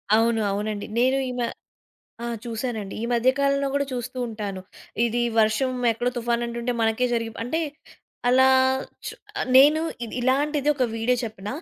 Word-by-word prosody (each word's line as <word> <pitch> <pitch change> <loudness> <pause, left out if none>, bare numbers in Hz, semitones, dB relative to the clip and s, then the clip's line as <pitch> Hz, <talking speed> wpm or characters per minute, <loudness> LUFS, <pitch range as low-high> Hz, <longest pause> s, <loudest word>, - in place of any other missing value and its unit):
అవును, 225 0 +2
అవునండి. 205 +1 -3
నేను 260 +2 +3
ఈమె 245 -1 -2 0.8
ఆ - - -2 0.2
చూసానండి. 225 -3 -4
ఈ - - -3
మధ్య 240 +2 +3
కాలంలో 280 0 +2
కూడా 280 0 +1
చూస్తూ 245 +1 -5
ఉంటాను. 205 -4 -5 0.4
ఇది 235 +1 0 0.2
వర్షం, 220 +4 +2 0.2
ఎక్కడో 240 +2 -1
తుఫాను 240 0 0
అంటుంటే 235 +1 -3
మనకే 225 +2 +2
జరిగి 230 -1 -1
అంటే 255 +8 -1 0.7
అలా 260 +1 +6 1.1
నేను 295 +4 +7 0.2
ఇది 225 - -8
ఇలాంటిది 285 +3 +1
ఒక 265 -3 +1
వీడియో 235 +3 +1
చెప్పన. 210 -3 -7
235 Hz, 140 wpm, -24 LUFS, 225-260 Hz, 1.1 s, నేను